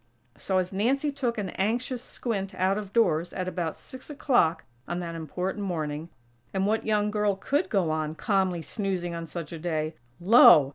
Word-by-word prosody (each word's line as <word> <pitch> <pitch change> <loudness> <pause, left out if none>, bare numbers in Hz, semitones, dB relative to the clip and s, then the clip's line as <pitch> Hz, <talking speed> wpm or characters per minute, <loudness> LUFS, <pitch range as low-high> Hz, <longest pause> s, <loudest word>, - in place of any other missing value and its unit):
So, 190 - -1
as 185 0 0
Nancy 270 +9 +1
took 255 -5 -2
an 200 -3 -2
anxious 240 +5 -1
squint 195 -5 -4
out 190 +2 +1
of 200 -2 -8
doors 175 -7 +2
at 185 -1 -3
about 175 -3 -3
six 260 +2 -12
o'clock 245 - +2 0.2
on 175 - -2
that 170 -2 -4
important 180 +5 -3
morning, 160 -3 -3 0.5
(and 190 0 +2
what 220 +2 0
young 210 -1 +2
girl 210 -1 +1
could 285 - 0
go 185 -7 +1
on, 155 0 -2
calmly 190 -4 0
snoozing 185 -3 -2
on 165 0 -5
such 165 -1 -6
a 165 - -6
day?) 155 -1 -2 0.3
Lo!! 175 - +8
190 Hz, 180 wpm, -27 LUFS, 170-215 Hz, 0.5 s, Lo